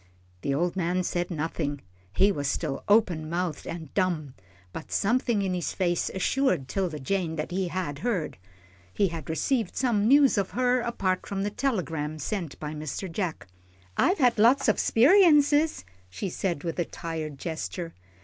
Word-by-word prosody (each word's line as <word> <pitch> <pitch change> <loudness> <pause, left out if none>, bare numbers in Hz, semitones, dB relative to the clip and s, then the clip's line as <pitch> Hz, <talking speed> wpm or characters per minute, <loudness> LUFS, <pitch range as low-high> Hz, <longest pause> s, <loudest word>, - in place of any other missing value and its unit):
The 140 - -1
old 175 +4 0
man 180 0 0
said 175 0 -2
nothing. 155 -3 -3 0.3
He 195 - +4
was 145 -6 -2
still 140 -1 -2
open 180 -7 +3
mouthed 170 -3 -3
and 160 -4 -7
dumb, 170 -8 0 0.4
but 160 - -8
something 225 -1 +1
in 190 -1 -1
his 180 -2 -2
face 175 -3 0
assured 190 - +1
'Tilda 180 0 -2
Jane 170 +3 -1
that 155 +2 -4
he 185 0 -1
had 170 -5 -3
heard 180 - -2 0.5
he 195 - +1
had 165 -1 -7
received 220 - 0
some 225 -5 +1
news 275 -3 +5
of 195 - -1
her, 250 0 +3
apart 195 -6 -1
from 195 -1 -2
the 205 - -1
telegram 165 - -2
sent 170 -2 -4
by 150 0 -5
Mr. 155 +4 -5
Jack. 175 -2 -3 0.5
"I've 370 +3 +3
had 245 -5 +3
lots 250 +6 +5
o' 215 - +5
speriences," 300 - +4 0.3
she 100 - -4
said, 170 -4 -2
with 170 0 -3
a 175 - +1
tired 160 -4 -5
gesture. 165 +2 -5
180 Hz, 165 wpm, -27 LUFS, 160-215 Hz, 0.5 s, news